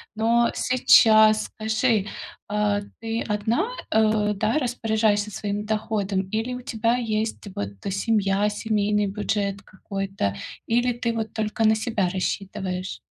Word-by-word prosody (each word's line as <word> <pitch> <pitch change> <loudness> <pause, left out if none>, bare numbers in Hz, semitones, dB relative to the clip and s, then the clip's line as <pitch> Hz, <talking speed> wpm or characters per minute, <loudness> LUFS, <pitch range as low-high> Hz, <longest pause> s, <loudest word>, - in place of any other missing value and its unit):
Но 235 +2 +3
сейчас 220 -3 +5
скажи, 220 -1 0 0.4
а, 205 0 0 0.2
ты 225 +1 -2
одна, 225 - 0 0.2
э, 215 -1 +2
да, 215 +3 0
распоряжаешься 220 -4 0
своим 205 0 -4
доходом, 210 -3 -1
или 225 +3 -1
у 250 - -6
тебя 230 -2 0
есть 220 -2 -2
вот 100 0 -4 0.2
семья, 205 -1 +1
семейный 210 -1 0
бюджет 200 -1 -2
какой-то? 195 - -4 0.3
Или 240 +1 +2
ты 235 0 -2
вот 225 -1 -4
только 220 0 -1
на 220 - +5
себя 215 -5 -1
рассчитываешь? 190 0 -3
215 Hz, 125 wpm, -24 LUFS, 205-225 Hz, 0.4 s, сейчас